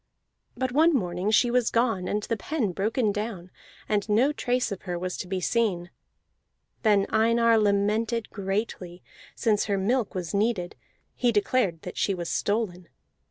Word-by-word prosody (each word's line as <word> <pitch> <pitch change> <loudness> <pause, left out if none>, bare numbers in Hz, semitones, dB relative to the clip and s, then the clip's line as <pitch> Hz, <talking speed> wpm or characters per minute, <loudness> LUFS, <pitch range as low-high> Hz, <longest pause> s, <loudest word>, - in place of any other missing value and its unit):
But 260 -1 -1
one 320 +5 +4
morning 180 -3 -1
she 235 +2 +3
was 245 -1 +2
gone 225 -6 +1
and 210 0 -1
the 230 - -1
pen 230 -1 -2
broken 215 +4 0
down, 200 -4 -5 0.4
and 210 0 0
no 240 +7 +3
trace 250 -4 -1
of 195 - -5
her 180 -2 -4
was 180 +1 -3
to - - -5
be 185 0 -2
seen. 185 -3 0 0.9
Then 205 -3 +3
Einar 230 +1 +3
lamented 215 +3 +1
greatly, 195 -3 -4 0.3
since 210 -2 +1
her 200 -2 0
milk 220 +3 0
was 180 -4 -4
needed: 200 -4 0 0.4
he 245 -1 +2
declared 205 -5 0
that 180 - -8
she 195 - +1
was 175 -2 -5
stolen. 200 -5 -1
210 Hz, 160 wpm, -26 LUFS, 185-230 Hz, 0.9 s, one